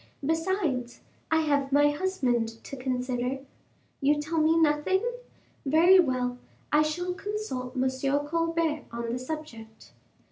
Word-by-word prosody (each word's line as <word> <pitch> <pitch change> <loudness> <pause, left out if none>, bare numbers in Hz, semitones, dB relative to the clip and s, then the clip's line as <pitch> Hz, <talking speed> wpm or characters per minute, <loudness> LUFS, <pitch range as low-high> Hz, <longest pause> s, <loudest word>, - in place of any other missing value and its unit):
besides, 325 -6 -1 0.3
I 320 0 +3
have 285 -3 +1
my 290 +1 +5
husband 250 -10 -1
to - - -7
consider. 255 0 -2 0.6
You 290 +2 +3
tell 315 +2 -1
me 315 +1 +4
nothing? 320 +6 +2 0.6
Very 330 +7 +6
well, 250 -6 +1 0.3
I 300 - +5
shall 350 +4 -1
consult 360 -12 -4
M. 260 0 +2 0.4
Colbert 330 -1 0
on 235 0 -3
the 250 - -2
subject." 250 -6 -8
295 Hz, 120 wpm, -28 LUFS, 255-330 Hz, 0.6 s, Very